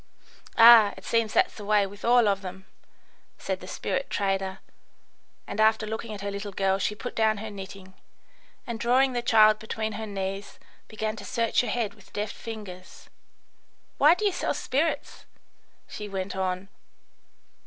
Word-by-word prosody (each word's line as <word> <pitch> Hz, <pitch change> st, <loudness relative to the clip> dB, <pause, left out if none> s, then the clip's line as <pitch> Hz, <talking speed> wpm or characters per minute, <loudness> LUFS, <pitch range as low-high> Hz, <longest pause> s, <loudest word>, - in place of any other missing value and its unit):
"Ah, 230 Hz, -3 st, +8 dB
it -, -, -12 dB
seems 230 Hz, -2 st, +1 dB
that's -, -, +2 dB
the 210 Hz, -, -10 dB
way 205 Hz, -1 st, +3 dB
with 200 Hz, +1 st, -11 dB
all 240 Hz, -1 st, +5 dB
of 195 Hz, -1 st, +1 dB
them," 190 Hz, 0 st, -8 dB, 0.7 s
said -, -, -3 dB
the -, -, -11 dB
spirit -, -, -3 dB
trader; 195 Hz, -1 st, -1 dB, 0.9 s
and 205 Hz, -, -6 dB
after 220 Hz, 0 st, +3 dB
looking 220 Hz, +1 st, -5 dB
at 205 Hz, -2 st, -7 dB
her 200 Hz, 0 st, -3 dB
little 200 Hz, +1 st, -5 dB
girl 195 Hz, 0 st, 0 dB
she 210 Hz, -, -1 dB
put 245 Hz, +4 st, -7 dB
down 220 Hz, -1 st, +2 dB
her 220 Hz, +1 st, -6 dB
knitting, 190 Hz, -1 st, -10 dB, 0.7 s
and, 235 Hz, -2 st, -5 dB
drawing 255 Hz, +3 st, +3 dB
the 240 Hz, -, -1 dB
child 215 Hz, -2 st, +5 dB
between 220 Hz, 0 st, -4 dB
her 220 Hz, +1 st, -5 dB
knees, 195 Hz, 0 st, -5 dB, 0.3 s
began 215 Hz, 0 st, -3 dB
to -, -, -8 dB
search 230 Hz, -1 st, +1 dB
her 245 Hz, -, -4 dB
head 225 Hz, -4 st, -1 dB
with 205 Hz, -2 st, -20 dB
deft 205 Hz, 0 st, -3 dB
fingers. 205 Hz, -5 st, -10 dB, 0.9 s
"Why 305 Hz, +4 st, +7 dB
do 425 Hz, -, -3 dB
you 405 Hz, -, +3 dB
sell 360 Hz, -, -2 dB
spirits?" 310 Hz, +5 st, -2 dB, 0.6 s
she 210 Hz, -1 st, -7 dB
went 190 Hz, -1 st, -4 dB
on. 185 Hz, 0 st, -2 dB
215 Hz, 165 wpm, -26 LUFS, 195-230 Hz, 0.9 s, Ah